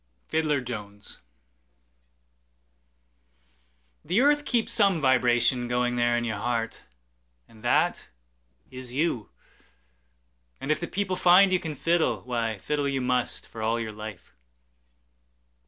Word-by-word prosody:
Fiddler 155 -3 +1
Jones 105 -4 -8 2.8
THE 180 +7 +1
EARTH 290 +2 +3
keeps 235 -4 +1
some 200 -6 +3
vibration 125 -2 +3
goingThere 120 -1 +1
in 120 - -1
your 110 -3 -3
heart, 115 -1 -2 0.7
and 110 -1 -18
that - - +1 0.6
is 130 -1 -7
you. 130 - -1 1.3
And 140 - -2
if 155 - +1
the 175 - -4
people 190 -1 -2
find 185 +2 +5
you 185 - +3
can 155 -3 -5
fiddle, 165 +3 +1
Why, 115 -3 -2
fiddle 145 +7 -2
you 135 -1 -1
must, 125 -1 -1
for 115 - -9
all 115 +2 0
your 110 -2 -5
life. 105 -3 -10
125 Hz, 120 wpm, -26 LUFS, 115-170 Hz, 2.8 s, find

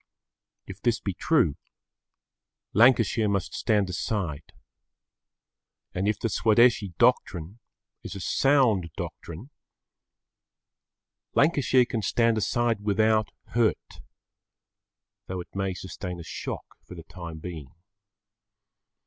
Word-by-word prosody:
If - - -10
this - - +1
be - - -3
true, 70 - +2 1.2
Lancashire 115 -2 +4
must 100 -2 -1
stand 105 -4 +1
aside. 90 -5 -3 1.4
And 95 +2 -1
if 105 - +1
the - - -1
Swadeshi 110 -3 +3
doctrine 100 -5 +1 0.4
is - - -8
a - - -6
sound 115 -5 +2
doctrine, 90 - -7 1.8
Lancashire 140 -4 +4
can 120 -2 -3
stand 115 +2 +2
aside 115 0 0
without 110 +1 +2 0.2
hurt, 115 -1 -1 1.3
though 95 0 -4
it 90 - -10
may 95 -1 -2
sustain 90 -1 -7
a - - -7
shock - - -6 0.2
for 90 - -11
the 85 - -9
time 85 -1 -9
being. 80 -4 -8
105 Hz, 105 wpm, -26 LUFS, 90-115 Hz, 1.8 s, Lancashire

